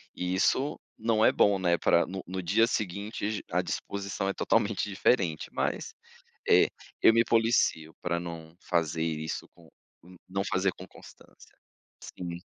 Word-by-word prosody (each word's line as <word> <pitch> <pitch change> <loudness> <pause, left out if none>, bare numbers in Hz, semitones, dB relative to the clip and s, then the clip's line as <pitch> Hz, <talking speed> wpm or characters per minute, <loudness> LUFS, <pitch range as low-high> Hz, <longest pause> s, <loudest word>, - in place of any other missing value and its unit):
e 90 0 -2
isso 130 +9 +1 0.2
não 110 0 +2
é - - +6
bom, 100 -1 +3
né, 85 -2 +2
pra 85 - +3
no 95 0 -6
no 95 0 -4
dia 115 +7 +3
seguinte 105 +1 -3
j 110 - -4
à - - +2
disposição 100 0 -4
é - - -1
totalmente - - +1
diferente, 95 -5 +1
mas, - - -2 0.5
eh, - - +6 0.3
eu 115 - +8
me 115 0 +5
policio 110 -9 +2
pra 85 -1 -1
não 85 -1 -8
fazer 80 -2 -1
isso 80 -1 -3
com, 85 -2 -19 0.3
n 90 0 -15
não 95 +1 -2
fazer 95 0 +1
com 95 - -11
constância, - - -17 0.5
sim. 85 -1 -7
95 Hz, 155 wpm, -28 LUFS, 85-105 Hz, 0.5 s, eu